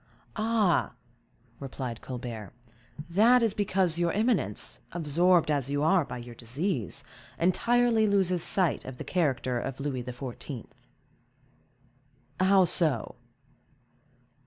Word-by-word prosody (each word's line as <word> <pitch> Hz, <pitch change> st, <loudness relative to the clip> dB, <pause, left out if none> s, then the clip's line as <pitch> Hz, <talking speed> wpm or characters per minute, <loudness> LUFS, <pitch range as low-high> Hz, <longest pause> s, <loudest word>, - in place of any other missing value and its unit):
"Ah," 215 Hz, -, +1 dB, 0.7 s
replied 130 Hz, -4 st, -6 dB
Colbert, 120 Hz, -5 st, -7 dB, 0.5 s
"that 230 Hz, +8 st, +4 dB
is 225 Hz, -3 st, +1 dB
because 185 Hz, -4 st, +1 dB
your 170 Hz, -1 st, +1 dB
eminence, 210 Hz, -, 0 dB
absorbed 170 Hz, +1 st, +2 dB
as 140 Hz, -3 st, 0 dB
you 145 Hz, +1 st, 0 dB
are 175 Hz, +2 st, +4 dB
by 130 Hz, -, -7 dB
your 120 Hz, 0 st, -9 dB
disease, 125 Hz, -, -3 dB, 0.3 s
entirely 230 Hz, +5 st, +2 dB
loses 190 Hz, -3 st, +2 dB
sight 180 Hz, -3 st, 0 dB
of 130 Hz, -1 st, -8 dB
the -, -, -6 dB
character 130 Hz, -8 st, 0 dB
of 135 Hz, +2 st, -5 dB
Louis 135 Hz, -3 st, -3 dB
XIV." 125 Hz, 0 st, -7 dB, 1.7 s
"How 190 Hz, 0 st, +5 dB
so?" 165 Hz, -3 st, +1 dB
165 Hz, 110 wpm, -28 LUFS, 130-195 Hz, 1.7 s, How